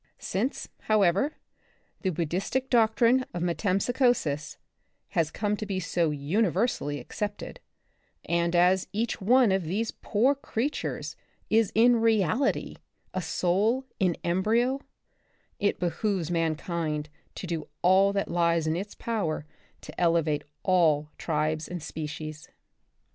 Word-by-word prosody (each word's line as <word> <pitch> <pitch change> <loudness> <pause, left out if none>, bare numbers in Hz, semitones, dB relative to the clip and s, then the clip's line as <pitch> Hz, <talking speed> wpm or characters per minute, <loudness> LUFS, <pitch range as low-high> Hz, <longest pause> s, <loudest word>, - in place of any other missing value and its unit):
Since, 230 +9 -2
however, 210 - +2 0.6
the 190 - 0
Buddhistic 185 - -2
doctrine 235 +2 +4
of 175 - -2
metempsychosis 195 - +1 0.5
has 165 -2 +1
come 210 +4 -1
to 215 - -4
be 195 -2 -1
so 170 -1 0
universally 165 - 0
accepted, 205 -1 -5 0.7
and 170 0 +1
as 180 +2 +4
each 220 +1 -2
one 240 +2 +5
of 190 -1 +1
these 210 +7 -1
poor 240 +7 +1
creat 275 0 -2
ures - - -4 0.4
is 220 -2 +3
in 235 +2 +6
reality 225 - +1 0.4
a 185 - -1
soul 200 - +1
in 180 -3 +2
embryo, 225 +9 +1 0.8
it 205 - +1
behoves 180 -1 -1
mankind 160 -2 -1 0.3
to - - -6
do 165 -3 -4 0.2
all 190 +2 +5
that 200 0 -1
lies 170 -1 +2
in 155 0 0
its 200 +4 -5
power 195 -10 -2 0.4
to - - -8
ele 170 -1 +4
vate 150 -1 -1 0.2
all 155 -5 +3
tribes 155 0 -1
and 175 -3 -6
species. 155 0 -6
185 Hz, 125 wpm, -27 LUFS, 165-220 Hz, 0.8 s, in